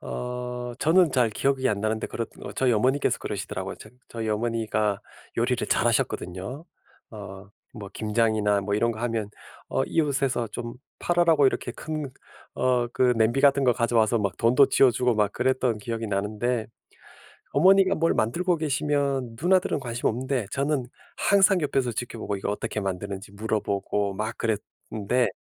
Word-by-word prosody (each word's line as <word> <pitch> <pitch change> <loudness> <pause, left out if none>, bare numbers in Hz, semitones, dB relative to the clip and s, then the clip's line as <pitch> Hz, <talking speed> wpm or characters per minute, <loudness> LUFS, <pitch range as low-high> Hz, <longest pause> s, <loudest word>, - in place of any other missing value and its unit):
어 125 - -5
저는 165 -1 +4
잘 125 -3 +3
기억이 130 +3 0
안 100 -1 -1
나는데 110 +1 -1
그렇 115 -1 -4 0.3
저희 130 -2 +3
어머니께서 130 +6 +1
그러시더라고요. - - -5
저 - - -12 0.2
저희 115 -1 -4
어머니가 110 -2 0 0.4
요리를 - - 0
잘 - - +2
하셨거든요. 95 - -2 0.5
어 100 -2 -10 0.3
뭐 100 -1 -8
김장이나 105 -2 +1
뭐 100 +1 -3
이런 115 +3 +2
거 110 - -6
하면 115 -3 -2 0.4
어 - - 0
이웃에서 135 -7 0
좀 120 +2 -6 0.2
팔으라고 170 -5 +3
이렇게 120 - -1
큰 155 -2 -5 0.4
어 125 -1 +1
그 125 -1 +4
냄비 120 +5 +2
같은 140 -1 +5
거 125 -2 +4
가져와서 115 -1 +2
막 100 -4 -1
돈도 125 +4 +5
쥐여 130 -2 +5
주고 125 -1 +1
막 105 -1 +2
그랬던 130 -2 +1
기억이 115 +1 -4
나는데 105 +3 -1 0.9
어머니가 190 +5 +5
뭘 165 +1 +2
만들고 170 +10 +1
계시면 140 -5 -1
누나들은 180 -3 +2
관심 120 -2 -2
없는데 125 -1 -2
저는 140 -2 0 0.3
항상 195 -2 +4
옆에서 135 -4 0
지켜보고 115 -3 -4
이거 95 - -3
어떻게 105 +1 -3
만드는지 100 +1 -5
물어보고 100 -1 -1
막 110 +3 -3
그랬는데 110 +2 -1
120 Hz, 345 characters per minute, -25 LUFS, 105-135 Hz, 0.9 s, 같은